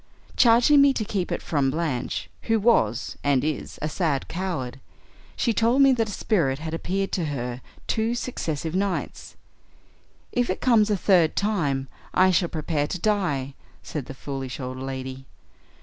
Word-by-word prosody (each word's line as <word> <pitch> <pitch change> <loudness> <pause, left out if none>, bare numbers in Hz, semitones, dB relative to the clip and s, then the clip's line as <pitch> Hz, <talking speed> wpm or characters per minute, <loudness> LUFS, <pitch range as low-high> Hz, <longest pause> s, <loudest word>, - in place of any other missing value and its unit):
Charging 245 +4 +6
me 280 -1 +6
to 220 - -2
keep 195 -3 -2
it - - -2
from 140 -4 +1
Blanche, 145 -4 -2 0.2
who 225 0 +4
was, 160 - +2
and 140 -2 +2
is, 155 0 -3
a - - +1
sad 155 -3 -1
coward, 165 -8 -4 0.6
she 235 - +1
told 235 +5 +4
me 270 -1 +6
that 225 -3 0
a - - -5
spirit 165 -10 +1
had 160 +2 -6
appeared 195 +4 -2
to 175 - -1
her 125 -4 -4 0.2
two 225 +1 0
successive 165 - -3
nights. 195 0 -2 1.0
'If 245 -1 0
it 185 - -1
comes 225 -4 +4
a 205 - +2
third 175 -4 +3
time, 150 -11 0 0.3
I 185 0 +5
shall 175 -1 +2
prepare 155 -2 -1
to 185 - -3
die,' 165 -10 0 0.3
said 145 -5 -5
the 135 - -8
foolish 135 -2 -5
old 130 0 -5
lady. 130 0 -6
165 Hz, 165 wpm, -25 LUFS, 135-210 Hz, 1.0 s, Charging